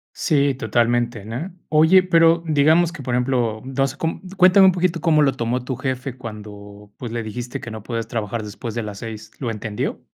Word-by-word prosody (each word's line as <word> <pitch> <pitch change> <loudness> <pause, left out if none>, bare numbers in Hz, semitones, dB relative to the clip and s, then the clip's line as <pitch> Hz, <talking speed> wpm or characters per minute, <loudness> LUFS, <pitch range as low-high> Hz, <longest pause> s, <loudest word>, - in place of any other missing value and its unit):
Sí, 140 -3 +2
totalmente, 120 -3 0
¿no? 125 - -5 0.2
Oye, 160 +5 +5
pero 165 -2 +4
digamos 160 +3 +3
que, 165 -4 -9
por 125 -1 -2
ejemplo, 120 -3 0
no 135 +1 0
sé, 135 - -8
com 160 +2 -3 0.2
cuéntame 190 +1 +7
un - - +6
poquito 175 -2 -1
cómo 155 -3 +4
lo 135 - +3
tomó 120 +2 -2
tu 130 - -3
jefe 130 0 -4
cuando, 105 -2 -10
pues, 120 -3 -6
le 115 -1 -3
dijiste 120 +3 -6
que 115 - -8
no 110 -1 -7
puedes 115 0 -4
trabajar 115 -1 -3
después 105 +2 -7
de 120 - -2
las 105 -2 -7
6, 110 -2 -8
¿lo 125 - -3
entendió? 110 -1 -4
125 Hz, 200 wpm, -21 LUFS, 115-155 Hz, 0.2 s, cuéntame